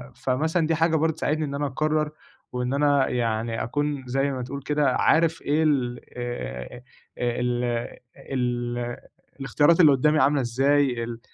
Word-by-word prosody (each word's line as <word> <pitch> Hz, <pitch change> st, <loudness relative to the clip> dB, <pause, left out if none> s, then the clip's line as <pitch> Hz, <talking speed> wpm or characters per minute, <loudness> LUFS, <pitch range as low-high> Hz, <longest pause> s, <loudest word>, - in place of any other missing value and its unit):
فمثلًا 155 Hz, +5 st, 0 dB
دي 165 Hz, -, +1 dB
حاجة 165 Hz, +1 st, +2 dB
برضه 160 Hz, +1 st, +1 dB
بتساعدني 155 Hz, 0 st, -1 dB
إن 140 Hz, -1 st, -5 dB
أنا 145 Hz, +1 st, -1 dB
أقرّر 155 Hz, +2 st, 0 dB, 0.4 s
وإن 125 Hz, +1 st, -2 dB
أنا 145 Hz, -1 st, +3 dB
يعني 115 Hz, -1 st, -1 dB
أكون 145 Hz, +2 st, -2 dB
زَيّ 135 Hz, +3 st, 0 dB
ما 130 Hz, -2 st, -4 dB
تقول 140 Hz, +3 st, -6 dB
كده 145 Hz, -2 st, +1 dB
عارف 165 Hz, 0 st, +2 dB
إيه 150 Hz, +3 st, +1 dB
ال 130 Hz, -5 st, 0 dB, 0.2 s
آآ 120 Hz, -, -6 dB, 0.4 s
آآ 120 Hz, 0 st, -1 dB
ال 125 Hz, 0 st, 0 dB, 0.7 s
ال 120 Hz, -1 st, -2 dB, 0.4 s
الإختيارات 145 Hz, +5 st, +3 dB
اللي 155 Hz, -4 st, +7 dB
قدّامي 150 Hz, +3 st, +3 dB
عاملة 140 Hz, +2 st, +3 dB
إزاي، 130 Hz, 0 st, +1 dB
اللي 115 Hz, 0 st, -6 dB
135 Hz, 155 wpm, -25 LUFS, 120-150 Hz, 0.7 s, اللي